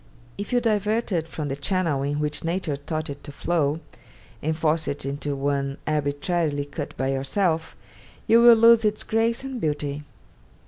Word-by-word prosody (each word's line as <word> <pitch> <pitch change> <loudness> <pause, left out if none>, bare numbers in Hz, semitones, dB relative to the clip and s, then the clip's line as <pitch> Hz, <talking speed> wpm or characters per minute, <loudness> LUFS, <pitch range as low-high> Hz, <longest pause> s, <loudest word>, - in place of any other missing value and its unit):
If 200 - -6
you 245 - +4
divert 220 0 0
it 165 -3 0
from 155 -2 -5
the 135 - -2
channel 150 -1 0
in 145 +1 -1
which 150 0 -2
nature 165 -3 -1
taught 155 +3 -4
it 140 0 -10
to 145 - -8
flow, 155 0 0 0.6
and 155 +1 -1
force 160 0 +1
it 140 - -3
into 140 +1 -3
one 140 0 -1
arbitrarily 150 0 0
cut 145 +1 -6
by 130 +1 0
yourself, 160 +5 0 0.5
you 230 +1 +6
will 240 0 +9
lose 230 0 +6
its 210 0 +1
grace 225 +2 0
and 265 -3 -5
beauty. 145 -1 -2
155 Hz, 170 wpm, -24 LUFS, 145-200 Hz, 0.6 s, will